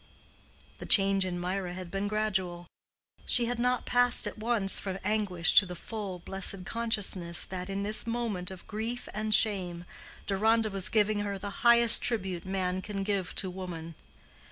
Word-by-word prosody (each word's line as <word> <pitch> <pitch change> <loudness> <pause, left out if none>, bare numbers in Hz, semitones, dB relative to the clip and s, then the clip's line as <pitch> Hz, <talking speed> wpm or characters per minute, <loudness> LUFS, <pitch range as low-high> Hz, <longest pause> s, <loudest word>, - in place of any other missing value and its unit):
The - - -9
change 195 -1 +5
in 180 -1 -5
Mirah 180 0 -4
had 180 -2 -9
been 195 +2 -3
gradual. 190 -5 -2 0.6
She 240 - +4
had 240 0 -3
not 250 +1 -1
passed 245 0 +3
at - - -4
once 215 -3 +1
from 190 -1 -5
anguish 195 -5 +1
to 200 - -2
the 180 - -8
full, 200 0 -7
blessed 190 +1 0
consciousness 205 -7 +1
that, 185 0 -7
in 195 +1 -4
this 215 +2 +1
moment 230 -6 -4
of 190 -2 -11
grief 225 +3 -6
and 215 0 -4
shame, 185 -5 +1 0.4
Deronda 220 +2 0
was 195 -1 +1
giving 215 -1 +1
her 200 -1 -4
the 200 +1 -7
highest 235 -1 +7
tribute 190 -7 -1
man 185 -1 -3
can 195 0 -5
give 195 -3 -3
to 185 - -1
woman. 175 -3 -8
195 Hz, 165 wpm, -28 LUFS, 185-215 Hz, 0.6 s, highest